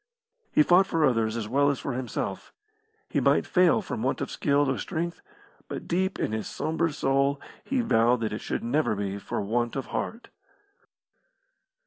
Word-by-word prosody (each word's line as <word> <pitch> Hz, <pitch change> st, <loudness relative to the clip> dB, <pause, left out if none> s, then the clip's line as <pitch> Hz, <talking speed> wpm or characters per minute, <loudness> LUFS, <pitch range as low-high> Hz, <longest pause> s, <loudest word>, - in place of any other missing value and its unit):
He 150 Hz, -, +5 dB
fought 180 Hz, +4 st, +5 dB
for 165 Hz, -4 st, +2 dB
others 115 Hz, -3 st, +1 dB
as 110 Hz, -2 st, -3 dB
well 140 Hz, +5 st, +3 dB
as 140 Hz, -, 0 dB
for 135 Hz, -, -3 dB
himself. 120 Hz, -6 st, -4 dB, 0.6 s
He -, -, 0 dB
might -, -, +3 dB
fail 180 Hz, -2 st, +3 dB
from -, -, -4 dB
want -, -, 0 dB
of -, -, -4 dB
skill 145 Hz, 0 st, +2 dB
or 135 Hz, -, 0 dB
strength, 170 Hz, -1 st, -3 dB, 0.5 s
but -, -, -6 dB
deep 190 Hz, +2 st, 0 dB
in -, -, -1 dB
his 110 Hz, -1 st, -3 dB
sombre 160 Hz, +1 st, -1 dB
soul 140 Hz, 0 st, +1 dB, 0.3 s
he 270 Hz, -2 st, 0 dB
vowed 120 Hz, -, +3 dB
that 110 Hz, -2 st, -1 dB
it 105 Hz, -, -4 dB
should -, -, -3 dB
never 120 Hz, -1 st, +1 dB
be 100 Hz, 0 st, -3 dB
for 100 Hz, -, -3 dB
want 120 Hz, +3 st, -1 dB
of 135 Hz, -, -3 dB
heart. 230 Hz, +2 st, -4 dB
135 Hz, 175 wpm, -27 LUFS, 115-165 Hz, 0.6 s, He